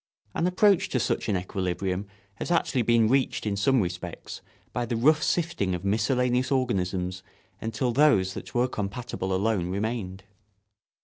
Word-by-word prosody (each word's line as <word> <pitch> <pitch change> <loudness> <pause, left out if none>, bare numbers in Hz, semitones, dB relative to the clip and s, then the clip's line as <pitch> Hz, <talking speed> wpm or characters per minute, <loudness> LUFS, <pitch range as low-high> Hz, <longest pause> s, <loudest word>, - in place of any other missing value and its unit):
An 170 - +1
approach 190 +1 +3
to 130 - 0
such 115 - -1
an 100 - +2
equilibrium 95 +1 -2 0.3
has - - -4
actually 165 -7 +2
been 115 -1 +4
reached 130 0 +1
in 105 -2 0
some 125 +5 +3
respects 90 -1 -5 0.3
by 120 - -1
the 120 0 -2
rough 150 +7 +4
sifting 155 - 0
of 90 +2 -6
miscellaneous 125 +5 +1
organisms 95 -8 -1 0.4
until 115 +3 -1
those 115 -9 +4
that - - -9
were 120 +1 +3
compatible 105 -3 -4
alone 95 -2 0
remained. 100 -1 -3
110 Hz, 145 wpm, -27 LUFS, 95-130 Hz, 0.4 s, been